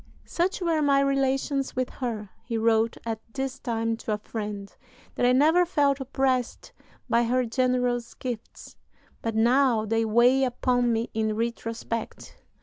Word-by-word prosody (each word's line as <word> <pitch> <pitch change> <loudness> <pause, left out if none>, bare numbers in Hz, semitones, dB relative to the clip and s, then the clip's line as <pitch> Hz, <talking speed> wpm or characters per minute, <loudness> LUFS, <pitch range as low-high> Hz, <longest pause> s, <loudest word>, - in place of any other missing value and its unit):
"Such 365 +3 -1
were 330 -3 +1
my 280 -1 +4
relations 275 0 0
with 255 0 -1
her," 220 -6 -5
he 230 0 -3
wrote 225 0 +2
at 225 -1 -3 0.2
this 270 -1 -3
time 225 -2 -1
to 220 - -3
a - - -1
friend, 210 -2 -6 0.4
"that 245 - +1
I - - +5
never 310 +7 +5
felt 285 -5 +1
oppressed 265 -2 -1 0.4
by 235 - +3
her 250 +2 +1
generous 245 0 0
gifts; 240 -3 -7 0.4
but 225 -1 -3
now 235 0 +3
they 225 +1 +1
weigh 240 +4 +4
upon 245 -1 +1
me 230 +1 -1
in 220 -1 0
retrospect. 230 0 -4
245 Hz, 145 wpm, -26 LUFS, 225-270 Hz, 0.4 s, I